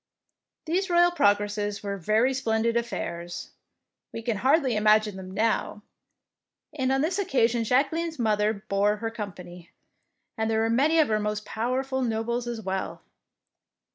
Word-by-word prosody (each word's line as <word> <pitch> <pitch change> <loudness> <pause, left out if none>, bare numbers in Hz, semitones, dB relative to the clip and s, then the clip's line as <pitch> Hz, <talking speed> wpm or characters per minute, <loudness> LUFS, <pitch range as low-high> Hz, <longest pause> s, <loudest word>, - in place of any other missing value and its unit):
These 365 +4 0
royal 350 0 +5
progresses 205 -7 +1
were 200 -1 -3
very 215 +8 +2
splendid 230 -2 0
affairs, 175 -7 -4 0.6
we 230 - -7
can 225 -2 -1
hardly 270 - +3
imag 215 0 +4
ine 205 - -6
them 190 -1 -8
now, 210 +1 -1 0.9
and 265 -3 0
on 270 0 +2
this 350 +6 0
occasion 240 - +1
Jacqueline's 310 +8 0
mother 215 -3 +2 0.2
bore 200 +1 +2
her 225 +1 -4
company, 180 -5 -8 0.7
and 220 0 0
there 220 0 +1
were 225 0 +1
many 290 +7 +3
of 310 -5 +4
her 215 -1 +2
most 210 0 -3
pow 225 +3 -2
erful 265 0 -1
nobles 235 +1 -2
as 235 -2 -4
well. 190 -1 -4
225 Hz, 150 wpm, -26 LUFS, 210-265 Hz, 0.9 s, royal